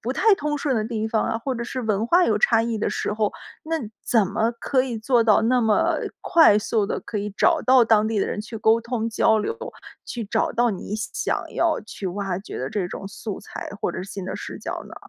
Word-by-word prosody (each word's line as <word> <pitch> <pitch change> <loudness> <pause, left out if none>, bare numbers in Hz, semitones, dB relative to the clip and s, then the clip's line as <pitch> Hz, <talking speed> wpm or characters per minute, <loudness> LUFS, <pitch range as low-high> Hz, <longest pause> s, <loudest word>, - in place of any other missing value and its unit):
不 245 +3 -2
太 435 +7 +4
通 295 -3 -2
顺 280 -2 0
的 215 - 0
地 220 -1 -2
方 220 -1 +1
啊？ 225 - -1
或 260 +3 -3
者 235 -1 -4
是 255 +2 -4
文 220 -2 0
化 350 +7 +5
有 - - +2
差 485 - +4
异 230 -1 -1
的 215 - -1
时 - - -2
候， 215 -1 0 0.3
那 325 +1 -2 0.3
怎 225 -5 +3
么 215 +4 0
可 260 -2 +2
以 245 -4 -4
做 235 +1 +3
到 215 -2 +5
那 245 +2 +3
么 215 -2 +2 0.2
快 320 - +5
速 215 0 0
地 - - -3
可 220 - -6
以 210 0 -2
找 335 -3 +3
到 255 -2 +6
当 215 -1 +4
地 220 -1 -1
的 - - +1
人 - - -3
去 225 +1 -7
沟 220 +1 +4
通、 230 -1 -2
交 220 0 +3
流， 450 - -2 0.5
去 235 - -5
找 200 - 0
到 240 0 +2
你 200 +1 -5
想 215 0 -2 0.2
要 335 -2 +1
去 210 -2 -7
挖 195 -1 -3
掘 195 - -8
的 130 - -3
这 190 0 -2
种 195 - -7
素 205 0 -6
材 - - -8
或 - - 0
者 - - -5
是 185 - -4
新 195 -2 -6
的 185 - -4
视 - - -7
角 - - -5
呢？ - - -11
225 Hz, 260 characters per minute, -23 LUFS, 210-250 Hz, 0.5 s, 到